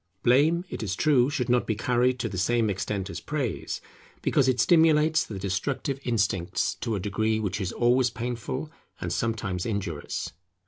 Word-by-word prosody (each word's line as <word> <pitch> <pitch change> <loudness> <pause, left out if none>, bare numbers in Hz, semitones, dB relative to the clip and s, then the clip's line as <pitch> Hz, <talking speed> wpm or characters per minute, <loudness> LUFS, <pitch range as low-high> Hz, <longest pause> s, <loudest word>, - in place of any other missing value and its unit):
Blame, 155 +8 +4
it - - -6
is 95 -4 -2
true, 135 -2 +3
should 135 -5 -1
not 125 -1 +2
be 110 - 0
carried 125 +3 +1
to 120 - -2
the 95 -4 -4
same 115 +2 +2
extent 100 0 -3
as - - -6
praise, 140 - -3 0.4
because 135 - +3
it 130 -1 +2
stimulates 160 -2 +4
the 105 - -7
destructive 100 +8 -2
instincts 100 -7 0
to 115 - -1
a - - -2
degree 110 +3 0
which 105 -1 -2
is 95 - -2
always 125 +1 +3
painful 125 +5 -4 0.3
and - - -3
sometimes 100 -6 -1
injurious. 95 -9 -3
120 Hz, 170 wpm, -27 LUFS, 100-130 Hz, 0.4 s, Blame